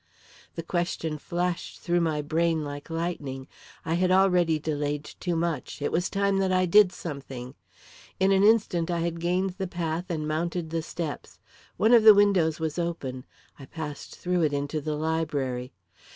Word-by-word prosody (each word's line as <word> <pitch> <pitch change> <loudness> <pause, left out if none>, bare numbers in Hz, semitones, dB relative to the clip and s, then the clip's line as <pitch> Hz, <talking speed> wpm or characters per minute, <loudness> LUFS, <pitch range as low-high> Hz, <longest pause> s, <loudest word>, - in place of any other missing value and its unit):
The 165 - -4
question 165 -3 -2
flashed 175 +2 -3
through 175 0 +1
my 155 -3 0
brain 160 +1 +1
like 145 +1 -7
lightning. 155 -6 -4 0.4
I 165 - -1
had 180 +2 +2
already 180 -4 +4
delayed 145 -1 -2
too 175 +2 -4
much; 165 -1 -2
it 145 - -1
was 175 +2 0
time 200 -1 +1
that 190 -1 +1
I 185 0 +3
did 190 +1 +6
something! 135 -7 -7 0.7
In 190 +1 +3
an 195 0 +4
instant 205 -6 +3
I 170 -1 0
had 170 0 -2
gained 180 +3 0
the 190 - -1
path 170 -1 -3
and 155 -3 -2
mounted 165 +1 -2
the 165 0 -1
steps. 160 -1 -6 0.4
One 220 +3 +4
of 235 - +8
the 215 -1 +9
windows 185 -6 +3
was 160 +1 -2
open. 135 -7 -4 0.3
I 135 - -9
passed 150 -2 -7
through 180 0 0
it 150 -3 +2
into 145 +2 -2
the 155 +1 -2
library. 145 -5 -2
165 Hz, 170 wpm, -27 LUFS, 150-180 Hz, 0.7 s, the